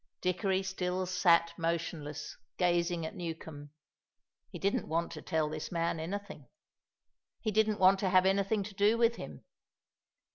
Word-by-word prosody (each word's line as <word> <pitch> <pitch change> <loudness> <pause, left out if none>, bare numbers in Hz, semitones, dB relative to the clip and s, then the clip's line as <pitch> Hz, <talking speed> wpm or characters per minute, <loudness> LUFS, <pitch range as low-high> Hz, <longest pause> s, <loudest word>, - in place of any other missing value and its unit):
Dickory 190 +1 0
still 185 -1 -2
sat 175 -2 +3
motionless, 165 -3 -3 0.2
gazing 175 -2 +1
at 160 - -5
Newcombe. 160 -4 -7 0.8
He - - -8
didn't 200 +1 0
want 165 +2 -1
to - - -7
tell 160 -1 0
this 155 0 -5
man 170 -1 -1
anything. 190 -4 -6 0.9
He 215 - -1
didn't 215 0 +2
want 190 +1 +6
to 190 - +1
have 185 0 +5
anything 200 +2 +2
to 205 +1 -8
do 205 +3 +3
with 235 0 +3
him. - - -9
180 Hz, 145 wpm, -32 LUFS, 165-195 Hz, 0.9 s, want